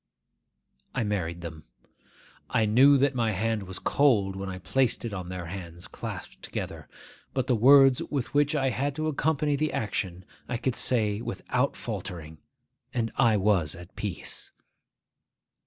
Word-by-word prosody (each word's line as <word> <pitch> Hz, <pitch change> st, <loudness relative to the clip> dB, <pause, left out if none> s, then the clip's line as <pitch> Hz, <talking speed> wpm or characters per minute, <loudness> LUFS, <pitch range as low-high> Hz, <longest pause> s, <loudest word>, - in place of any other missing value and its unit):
I 125 Hz, -, +1 dB
married 85 Hz, -5 st, -2 dB
them. 80 Hz, -3 st, -8 dB, 0.8 s
I 110 Hz, -, +2 dB
knew 130 Hz, +7 st, +6 dB
that 140 Hz, +1 st, +2 dB
my 115 Hz, -3 st, +1 dB
hand 110 Hz, +3 st, 0 dB
was 95 Hz, 0 st, -5 dB
cold 105 Hz, -10 st, +2 dB
when 95 Hz, 0 st, -5 dB
I 95 Hz, -, -5 dB
placed 125 Hz, +6 st, 0 dB
it 115 Hz, -, -4 dB
on 90 Hz, -3 st, -5 dB
their 90 Hz, -1 st, -5 dB
hands 85 Hz, -1 st, -8 dB
clasped -, -, -7 dB
together; -, -, -6 dB, 0.5 s
but 130 Hz, -2 st, +1 dB
the 130 Hz, -2 st, +2 dB
words 135 Hz, +2 st, +7 dB
with 130 Hz, -5 st, -3 dB
which 145 Hz, +1 st, +3 dB
I 135 Hz, -3 st, +1 dB
had 135 Hz, +3 st, -1 dB
to 155 Hz, 0 st, -2 dB
accompany 150 Hz, -1 st, +1 dB
the 155 Hz, +2 st, 0 dB
action 95 Hz, -4 st, -3 dB, 0.2 s
I 120 Hz, -, -1 dB
could 125 Hz, +1 st, -1 dB
say 105 Hz, -4 st, +2 dB
without -, -, -1 dB
faltering, 80 Hz, -3 st, -6 dB, 0.5 s
and 115 Hz, -3 st, -1 dB
I 115 Hz, -4 st, +4 dB
was 95 Hz, -7 st, +2 dB
at 90 Hz, 0 st, -12 dB
peace. -, -, -5 dB
110 Hz, 155 wpm, -27 LUFS, 95-135 Hz, 0.8 s, words